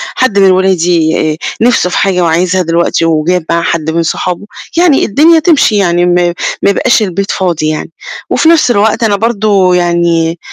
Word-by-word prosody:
حد 230 -6 0
من 195 -1 +4
ولادي 170 -4 +1
آآ 155 - -5 0.2
نِفسه 230 -6 +2
في - - -3
حاجة 185 -2 0
وعايزها 175 +2 0
دلوقتي 170 -1 -1
وجاب 165 +2 0
معاه 170 0 0
حد 160 -2 -2
من 165 +1 -1
صحابه، 180 +3 -3 0.3
يعني 340 -5 +3
الدنيا 320 +9 +3
تمشي 305 - +2
يعني 175 -2 +1
م 175 0 +1 0.5
ما - - +3
يبقاش 235 +4 +1
البيت 195 +1 -3
فاضي 170 -5 -2
يعني. 155 +1 -5 0.4
وفي 320 - +2
نفس 320 -6 +3
الوقت 220 +1 0
أنا 210 -2 +1
برضه 205 -4 +1
يعني 170 -1 0
180 Hz, 170 wpm, -10 LUFS, 170-210 Hz, 0.5 s, من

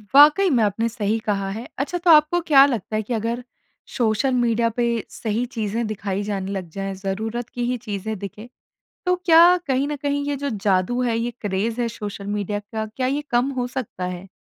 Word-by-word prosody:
वाक़ई 305 +7 +7
में 245 -6 +3
आपने 215 +3 +1
सही 220 -2 -1
कहा 195 -2 -1
है। 225 +5 -6
अच्छा 295 +6 -1
तो 345 -1 +4
आपको 305 +3 +6
क्या 285 -5 +7
लगता 230 -6 -2
है 215 - +1
कि 240 - -4
अगर, 230 +2 -2 0.5
सोशल 240 +3 +1
मीडिया 235 -2 +2
पे 240 - +2 0.2
सही 225 +2 -2
चीज़ें 230 -2 -2
दिखाई 200 -2 -3
जाने 200 -2 -3
लग 190 -4 -4
जाएँ, 195 +3 -4
ज़रूरत 220 +5 -4
की 245 - -4
ही 250 - -1
चीज़ें 215 -1 -4
दिखें, 205 +3 -8 0.6
तो 360 0 +3
क्या 340 +1 +7
कहीं 270 +1 +1
न 295 - -2
कहीं 285 0 -1
ये 290 - 0
जो 280 +1 -3
जादू 200 +2 +1
है, 235 -2 +1
ये 235 +1 -1
क्रेज 210 +3 -1
है 235 - +1
सोशल 205 -2 -7
मीडिया 205 0 -2
का, 220 +1 -5
क्या 255 +4 -3
ये 280 +3 0
कम 245 +3 +2
हो 245 - -1
सकता 245 -8 -5
है? 180 +1 -6
230 Hz, 205 wpm, -22 LUFS, 205-260 Hz, 0.6 s, वाक़ई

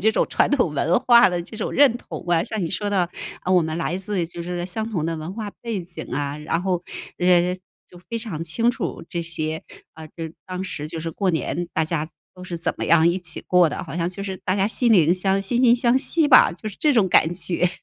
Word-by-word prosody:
这 220 +3 +4
种 - - +1
传 - - +2
统 245 - +2
文 165 +7 +2
化 245 -2 +6
的 175 -1 -2
这 215 +5 -10
种 215 - -3
认 280 -4 +5
同 - - -9
啊， 170 -1 +3
像 220 -3 -4
你 170 - -1
说 205 -1 -2
的， 185 -4 +1 0.4
呃， 185 - +1
我 180 -2 +5
们 160 0 -3
来 170 +1 -2
自 190 -3 -2
就 170 0 -8
是 175 0 -4
相 220 +5 -4
同 170 -7 -2
的 165 -1 -2
文 155 +3 -6
化 210 0 -5
背 225 -5 -3
景 170 -2 -7
啊， 145 +1 -2
然 160 +3 -2
后， 180 -2 -1 0.4
呃， 180 0 +3 0.3
就 175 - -15
非 230 -1 -3
常 190 -9 -5
清 225 +9 +1
楚 - - -5
这 170 -1 -3
些， 160 -1 -4 0.3
啊， 160 0 -10
就 - - -23 0.3
当 185 0 -4
时 150 -5 -2
就 165 +1 -6
是 165 +1 -4
过 190 +3 0
年 170 +1 -2
大 160 - +1
家 155 -1 -2 0.3
都 180 - -12
是 175 -2 -5
怎 165 - -1
么 - - -3
样 170 0 +5
一 175 +2 0
起 165 -4 -5
过 180 -2 +4
的， - - -5
好 165 - -7
像 170 0 0
就 190 +2 -4
是 190 -1 -4
大 185 - +1
家 195 0 +1
心 235 +1 +2
灵 175 -3 +5
相 190 +1 0
惺 195 +5 -1
惺 245 -1 +6
相 245 +1 +2
惜 315 +3 +3
吧， 255 - +7
就 180 +5 -7
是 200 - -10
这 300 -2 +3
种 215 -6 +3
感 165 -1 +4
觉。 175 0 0
180 Hz, 270 characters per minute, -22 LUFS, 165-210 Hz, 0.4 s, 吧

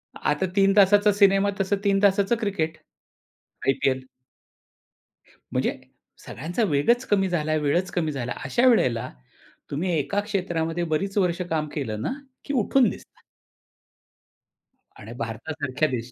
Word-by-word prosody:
आता 150 +5 0
3 195 0 +4
तासाचा 205 +1 +6
सिनेमा 200 0 +4
तसं 195 +1 +1
3 195 -1 +2
तासाचं 200 +2 +3
क्रिकेट, 165 -7 -2 0.9
आय-पी-एल. 135 -1 +1 1.5
म्हणजे - - 0 0.5
सगळ्यांचा 175 +9 -3
वेगच 235 - +2
कमी 195 -2 +1
झाला 155 -3 0
वेळच 175 +6 +1
कमी 160 -3 -1
झाला. 125 -3 -4
अशा 235 - +2
वेळेला 125 - +2 0.6
तुम्ही 165 +6 -1
एका 200 +7 -1
क्षेत्रामध्ये 175 -5 -2
बरीच 195 +5 -2
वर्ष 180 -2 +1
काम 155 -1 -1
केलं 110 -8 -3
ना - - -2 0.3
की 285 - -3
उठून 250 0 +3
दिसतात. - - -12 1.8
आणि 110 +3 -9
भारतासारख्या 140 +6 -2
देश 125 -1 -4
175 Hz, 125 wpm, -24 LUFS, 145-200 Hz, 1.8 s, तासाचा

